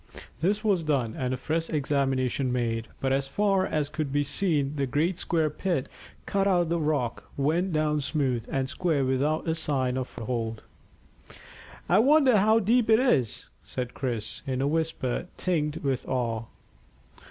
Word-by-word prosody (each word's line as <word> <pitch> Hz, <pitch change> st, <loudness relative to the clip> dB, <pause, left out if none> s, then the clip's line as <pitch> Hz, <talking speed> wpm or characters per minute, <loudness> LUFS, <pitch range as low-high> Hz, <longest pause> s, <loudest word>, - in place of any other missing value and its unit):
This 205 Hz, +6 st, +1 dB
was 200 Hz, -5 st, +2 dB
done, 135 Hz, -8 st, 0 dB
and 125 Hz, -1 st, -2 dB
a 130 Hz, -, -1 dB
fresh 160 Hz, +5 st, -2 dB
examination 135 Hz, -3 st, 0 dB
made, 115 Hz, -2 st, -1 dB
but 135 Hz, 0 st, 0 dB
as 135 Hz, 0 st, 0 dB
far 195 Hz, +4 st, +1 dB
as 150 Hz, -2 st, 0 dB
could 150 Hz, -1 st, -3 dB
be 145 Hz, +1 st, +2 dB
seen 145 Hz, -3 st, +1 dB
the 140 Hz, -2 st, 0 dB
great 165 Hz, +8 st, 0 dB
square 160 Hz, -4 st, 0 dB
pit 175 Hz, -9 st, -1 dB, 0.4 s
cut 195 Hz, 0 st, +1 dB
out 180 Hz, -3 st, +4 dB
of 170 Hz, -, -2 dB
the 170 Hz, 0 st, +1 dB
rock 145 Hz, -7 st, -1 dB
went 165 Hz, +7 st, +1 dB
down 155 Hz, -1 st, +1 dB
smooth 135 Hz, -5 st, 0 dB
and 135 Hz, -1 st, 0 dB
square 155 Hz, -2 st, 0 dB
without 140 Hz, +5 st, 0 dB
a 160 Hz, -, +2 dB
sign 135 Hz, -6 st, 0 dB
of 130 Hz, -1 st, -2 dB
foothold. 115 Hz, -2 st, -4 dB, 1.2 s
"I -, -, +4 dB
wonder 270 Hz, -1 st, +5 dB
how 215 Hz, +3 st, +4 dB
deep 225 Hz, +2 st, +2 dB
it 220 Hz, -, +7 dB
is," 135 Hz, -, +1 dB
said 125 Hz, -1 st, -5 dB
Chris, 115 Hz, -5 st, -4 dB
in 130 Hz, -1 st, -1 dB
a 135 Hz, -, +1 dB
whisper 160 Hz, -2 st, -1 dB
tinged 155 Hz, -4 st, 0 dB
with 135 Hz, -2 st, -1 dB
awe. 115 Hz, -3 st, -1 dB
145 Hz, 165 wpm, -27 LUFS, 130-170 Hz, 1.2 s, it